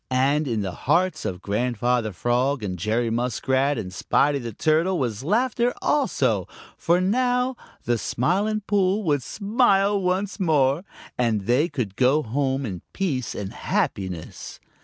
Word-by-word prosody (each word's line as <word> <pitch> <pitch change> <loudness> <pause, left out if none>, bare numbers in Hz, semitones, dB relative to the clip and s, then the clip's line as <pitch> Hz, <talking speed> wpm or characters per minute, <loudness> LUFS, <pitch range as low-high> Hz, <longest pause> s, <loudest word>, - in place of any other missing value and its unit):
And 140 +4 +2
in 115 -4 -1
the 95 -2 -3 0.2
hearts 180 -2 +2
of 90 0 -4
Grandfather 120 +1 0
Frog 120 +6 0
and 90 -3 -4
Jerry 110 +4 0
Muskrat 130 +4 0
and 95 -5 -5
Spotty 140 +8 +1
the 120 -2 -5
Turtle 160 - +1
was 120 -5 -2
laughter 240 - +1
also, 295 -2 +1 0.3
for 170 +2 +2
now 250 +6 +1 0.3
the 120 -1 0
Smiling 200 - 0
Pool 200 +1 +1
would 145 -6 +1
smile 200 - +2
once 185 +3 -1
more, 150 -3 +2 0.4
and 115 -4 +1
they 125 - +2
could 120 -10 -4
go 135 +6 +3
home 135 +3 -1
in 95 -6 -5
peace 140 - -2
and 100 -1 -5
happiness. 95 -4 -3
135 Hz, 140 wpm, -24 LUFS, 115-185 Hz, 0.4 s, go